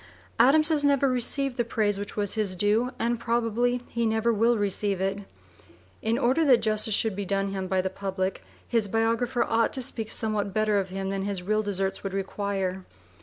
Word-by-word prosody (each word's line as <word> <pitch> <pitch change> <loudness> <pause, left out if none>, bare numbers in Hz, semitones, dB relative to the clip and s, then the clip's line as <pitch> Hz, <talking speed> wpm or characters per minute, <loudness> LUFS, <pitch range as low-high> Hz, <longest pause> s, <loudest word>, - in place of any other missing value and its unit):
Adams 305 +6 +5
has 305 -2 +2
never 280 -1 +3
received 255 +1 0
the 240 - +2
praise 210 -3 0
which 205 +1 -7
was 205 -2 0
his 210 -4 -1
due, 210 +6 +2
and 235 0 -1
probably 235 +1 0
he 235 - -2
never 225 +1 +1
will 230 +2 +3
receive 200 -1 0
it. 195 +1 -1 0.8
In 225 +1 0
order 260 +7 +2
that 250 -7 +4
justice 215 -1 +2
should 220 -2 0
be 200 - -3
done 195 +1 -1
him 190 -1 -4
by 185 0 +1
the 190 - -2
public, 190 -1 -3 0.2
his 230 -3 0
biographer 230 +4 +1
ought 225 0 +1
to 265 - -3
speak 225 -4 -2
somewhat 215 -4 -2
better 215 -1 +2
of 190 -1 -3
him 195 +1 -4
than 195 0 -2
his 195 -2 -3
real 215 +3 +1
deserts 195 -2 -2
would 195 -1 -4
require. 195 -1 -3
215 Hz, 195 wpm, -26 LUFS, 195-235 Hz, 0.8 s, Adams